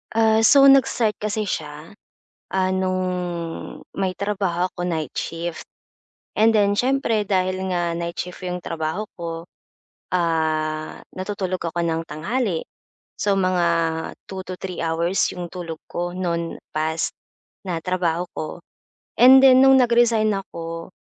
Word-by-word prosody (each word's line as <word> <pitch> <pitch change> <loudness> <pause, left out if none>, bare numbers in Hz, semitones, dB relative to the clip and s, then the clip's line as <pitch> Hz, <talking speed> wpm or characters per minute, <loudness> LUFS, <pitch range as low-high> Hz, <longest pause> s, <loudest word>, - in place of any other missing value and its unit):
Ah, 220 -1 +4
so 275 +5 +6
nag-start 240 -5 +3
kasi 215 +1 -1
siya, 150 -5 -5 0.6
ah, 190 -1 +1
no'ng, 180 -3 -3
may 190 -1 0
trabaho 195 -4 -1
ako - - -6
night 160 -5 -2
shift. 165 0 -5 0.7
And 220 +1 +5
then 205 -2 +3
siyempre 245 -2 +1
dahil 185 -1 0
nga 175 -1 0
night 170 0 -4
shift 180 +1 -6
'yong 180 0 -3
trabaho 165 +4 -3
ko, 165 -1 -6 0.7
ah, 155 -3 0 0.2
natutulog 185 -1 -2
ako 170 +1 -2
ng 165 -1 -1
tanghali. 175 +4 -2 0.6
So 205 - +1
mga 185 -2 +2 0.6
2 190 -1 -5
to 185 - -5
3 185 -2 -5
hours 165 +3 0 0.2
'yong 175 -1 -6
tulog 165 -3 -7
ko 175 0 -3
no'n 170 -2 -2 0.2
past, 160 +1 0 0.6
na 170 -3 -3
trabaho 180 -1 0
ko, 155 - -4 0.7
and 260 +2 +9
then 260 -1 +7
no'ng 270 0 +7
nag-resigned 235 -3 +3
ako, 165 -3 -7
180 Hz, 130 wpm, -22 LUFS, 165-205 Hz, 0.7 s, and